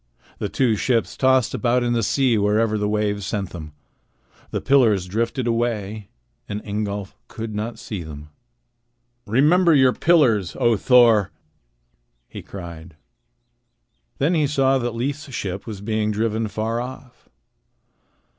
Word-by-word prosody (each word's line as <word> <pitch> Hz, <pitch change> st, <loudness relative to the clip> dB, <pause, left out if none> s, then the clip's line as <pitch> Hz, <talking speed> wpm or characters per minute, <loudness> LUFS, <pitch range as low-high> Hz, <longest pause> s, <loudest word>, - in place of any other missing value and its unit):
The 105 Hz, -, -2 dB
two 115 Hz, +2 st, +1 dB
ships 115 Hz, +2 st, 0 dB
tossed 130 Hz, -2 st, +2 dB
about 125 Hz, 0 st, +1 dB
in 120 Hz, 0 st, 0 dB
the 115 Hz, -, +1 dB
sea 125 Hz, +3 st, +2 dB
wherever 105 Hz, +1 st, +1 dB
the 105 Hz, -1 st, -1 dB
waves 105 Hz, -1 st, -1 dB
sent 95 Hz, -1 st, -3 dB
them. 80 Hz, -3 st, -8 dB, 0.8 s
The -, -, -2 dB
pillars 115 Hz, -9 st, +3 dB
drifted 115 Hz, +6 st, -2 dB
away, 110 Hz, -3 st, -2 dB, 0.4 s
and 105 Hz, -, -3 dB
Ingolf 100 Hz, -1 st, -4 dB
could 110 Hz, -1 st, -6 dB
not 110 Hz, +3 st, -4 dB
see 105 Hz, -5 st, -6 dB
them. 75 Hz, -2 st, -9 dB, 1.0 s
"Remember 155 Hz, -, +4 dB
your 130 Hz, -2 st, +5 dB
pillars, 125 Hz, -, +2 dB
O 120 Hz, -1 st, +2 dB
Thor!" 115 Hz, -3 st, +4 dB, 1.0 s
he -, -, -9 dB
cried. 85 Hz, -3 st, -10 dB, 1.2 s
Then 150 Hz, +6 st, +1 dB
he 155 Hz, -4 st, +2 dB
saw 135 Hz, -2 st, +2 dB
that 120 Hz, -2 st, -3 dB
Leif's 140 Hz, +4 st, -4 dB
ship 95 Hz, -4 st, -5 dB
was 105 Hz, -3 st, -7 dB
being 110 Hz, 0 st, -1 dB
driven 110 Hz, +1 st, -1 dB
far 110 Hz, +3 st, -2 dB
off. 125 Hz, 0 st, -10 dB
110 Hz, 135 wpm, -22 LUFS, 105-125 Hz, 1.2 s, your